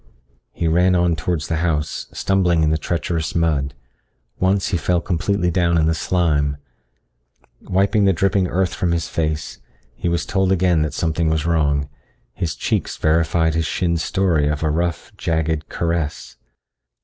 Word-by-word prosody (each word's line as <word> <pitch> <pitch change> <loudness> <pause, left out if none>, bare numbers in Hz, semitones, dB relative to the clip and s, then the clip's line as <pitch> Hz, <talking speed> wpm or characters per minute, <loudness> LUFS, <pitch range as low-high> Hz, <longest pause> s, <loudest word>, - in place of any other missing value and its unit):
He 85 - -2
ran 90 +3 +3
on 85 -1 +2
towards 80 0 -2
the 80 - -1
house, 80 -2 -1
stumbling 90 -4 +1
in 75 - +2
the 80 - +2
treacherous 85 0 -2
mud. 75 -5 0 0.6
Once 95 +1 +1
he 90 - +1
fell 90 +1 +1
completely 90 +1 0
down 85 -1 +2
in 80 - +3
the 80 - +2
slime. 75 -4 0 1.0
Wiping 100 +2 +2
the 95 - +5
dripping 95 +1 +1
earth 90 +1 0
from 85 -2 0
his 85 -1 -1
face, 80 -2 -3 0.3
he - - -3
was 85 0 -1
told 95 -1 +1
again 90 -3 +3
that 75 -2 -2
something 80 0 0
was 80 -1 0
wrong. 70 -4 +1 0.5
His 85 +4 -3
cheeks - - -2
verified 80 +1 +2
his 80 0 0
shin's 85 -2 0
story 85 -7 +1
of 75 +1 -1
a 80 - +1
rough, 85 +6 -2
jagged 80 -2 -1
caress. 85 -3 -2
85 Hz, 160 wpm, -20 LUFS, 80-90 Hz, 1.0 s, the